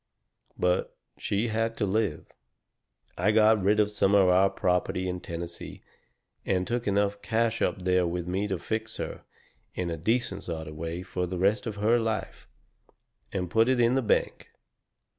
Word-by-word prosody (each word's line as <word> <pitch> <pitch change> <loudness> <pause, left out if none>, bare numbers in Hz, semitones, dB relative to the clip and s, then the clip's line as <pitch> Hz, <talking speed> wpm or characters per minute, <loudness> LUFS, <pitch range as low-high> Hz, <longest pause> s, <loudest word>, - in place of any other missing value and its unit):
But 90 0 0 0.2
she 105 +4 -1
had 115 +1 -1
to 105 - +1
live. 100 -5 -1 0.9
I 95 +4 +3
got 110 -1 +5
rid 105 +3 +3
of 105 0 +3
some 100 -1 +2
of 95 -2 +5
our 95 +2 +5
property 90 0 0
in 90 0 -3
Tennessee, 85 0 -7 0.6
and 90 -1 0
took 120 +1 -2
enough 100 0 +1
cash 115 0 0
up 95 - 0
there 90 -1 +2
with 90 0 -3
me 95 +3 -1
to 95 -2 -2
fix 110 +5 -4
her, - - -5 0.5
in 90 -2 -2
a 80 - -3
decent 110 +2 -1
sort 80 -2 -5
of 75 - -8
way, 85 +3 -4
for 90 -1 -3
the 90 +1 -4
rest 100 +6 +1
of 110 - -4
her 110 +4 +3
life, 110 -4 -3 0.8
and 90 -2 -3
put 115 +2 +4
it 130 -1 +2
in 120 +1 +4
the 135 - +2
bank. 110 - 0
100 Hz, 175 wpm, -28 LUFS, 90-110 Hz, 0.9 s, got